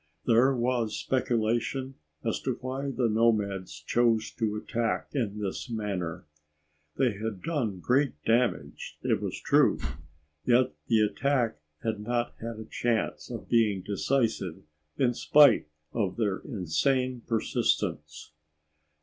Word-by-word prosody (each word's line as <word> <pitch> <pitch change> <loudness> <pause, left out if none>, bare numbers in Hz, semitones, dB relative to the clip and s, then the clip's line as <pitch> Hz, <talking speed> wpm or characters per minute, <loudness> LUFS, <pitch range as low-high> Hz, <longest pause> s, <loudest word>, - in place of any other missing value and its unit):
There 125 +3 +4
was 120 -2 0
speculation 125 +1 0 0.3
as - - -1
to - - -2
why 135 +2 -3
the 125 -2 +1
nomads 105 -7 +1
chose 115 +6 +2
to 110 -3 -1
attack 115 +1 -2
in 110 -7 -1
this 100 +3 -4
manner. 100 -7 -3 0.7
They 130 -3 +3
had 105 -1 -5
done 125 - -1
great 135 +5 +2
damage, 120 +2 0
it - - +1
was - - -3
true, - - +4 0.7
yet 125 +5 +3
the 110 -2 +4
attack 120 - +1 0.2
had 110 -2 -1
not 120 +2 -1
had 115 0 -5
a 110 - -7
chance 115 -1 -1
of - - -6
being 105 -5 +2
decisive 105 -4 -1 0.3
in 125 -2 +3
spite 145 - +5 0.3
of 100 -5 -1
their 105 -5 0
insane 125 - 0
persistence. 75 -9 -1
115 Hz, 125 wpm, -28 LUFS, 105-125 Hz, 0.7 s, spite